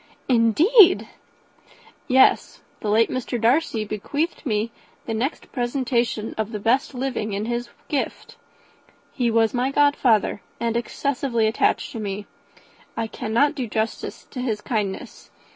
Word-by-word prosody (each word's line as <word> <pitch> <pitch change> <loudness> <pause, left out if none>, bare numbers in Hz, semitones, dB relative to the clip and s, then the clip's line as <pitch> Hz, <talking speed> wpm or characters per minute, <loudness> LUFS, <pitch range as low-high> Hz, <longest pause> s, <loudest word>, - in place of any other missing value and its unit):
"Indeed!" 330 - +5 1.0
"Yes 260 0 +3 0.2
the 210 - -3
late 225 +2 +3
Mr. 250 -1 -3
Darcy 230 -1 +2
bequeathed 285 - -3
me 215 0 0 0.3
the 225 - -3
next 250 +8 -3
presentation 240 -3 -1
of 220 0 -1
the 210 - -4
best 250 +6 +1
living 250 -5 -2
in 205 +2 -2
his 240 +1 -3 0.2
gift. 285 - -3 0.8
He 245 -3 0
was 225 -1 +2
my 250 +1 +1
godfather, 275 -8 +3 0.2
and 230 -1 -1
excessively 240 -1 -1
attached 220 +1 +1
to 230 - -6
me. 205 -1 -4 0.7
I 225 - 0
cannot 235 +5 0
do 255 -4 -4
justice 220 +1 -3
to 250 - -5
his 225 -4 -1
kindness. 210 -4 -4
235 Hz, 130 wpm, -23 LUFS, 220-265 Hz, 1.0 s, Indeed